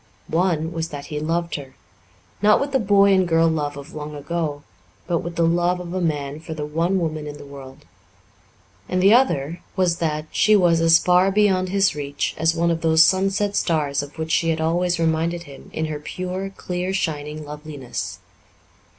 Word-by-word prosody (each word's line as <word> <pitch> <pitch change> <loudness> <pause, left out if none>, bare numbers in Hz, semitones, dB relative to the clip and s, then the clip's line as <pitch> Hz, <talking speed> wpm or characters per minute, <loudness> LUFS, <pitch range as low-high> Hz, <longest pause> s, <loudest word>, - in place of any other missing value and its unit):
One 165 -1 +1
was 165 -1 -3
that 145 -1 -7
he 150 - -2
loved 170 +2 -2
her 135 -2 -10 0.7
not 210 0 +5
with 280 0 -2
the 265 - +2
boy 200 -2 +4
and 185 -1 +3
girl 165 0 +3
love 150 -3 -1
of 140 +2 -10
long 150 0 -6
ago, 150 -1 -3 0.4
but 170 -2 0
with 170 0 -6
the 170 - +2
love 175 +2 +1
of 175 -1 -7
a 185 - -1
man 145 -3 -2
for 160 0 -7
the 150 -1 -4
one 165 +5 0
woman 155 -3 -3
in 145 0 -7
the 145 - -11
world; 135 -1 -12 1.0
and 185 - 0
the 195 +3 +6
other 170 - +2
was 180 -2 +1
that 155 -2 -2
she 215 - +4
was 175 -4 +4
as 165 0 +6
far 180 +2 +3
beyond 190 -2 +2
his 195 0 +2
reach 145 -1 -3
as 160 +1 +2
one 170 0 +1
of 165 0 -2
those 160 0 +5
sunset 195 +3 +1
stars 150 -5 +1
of 145 +2 -10
which 160 0 -4
she 165 - +2
had 160 -1 0
always 175 +2 +1
reminded 165 +1 0
him 140 -4 -13
in 160 - -2
her 155 -1 -4
pure, 185 +5 -5
clear 180 -1 -4
shining 150 -4 -3
loveliness. 150 -3 -6
165 Hz, 195 wpm, -22 LUFS, 150-180 Hz, 1.0 s, the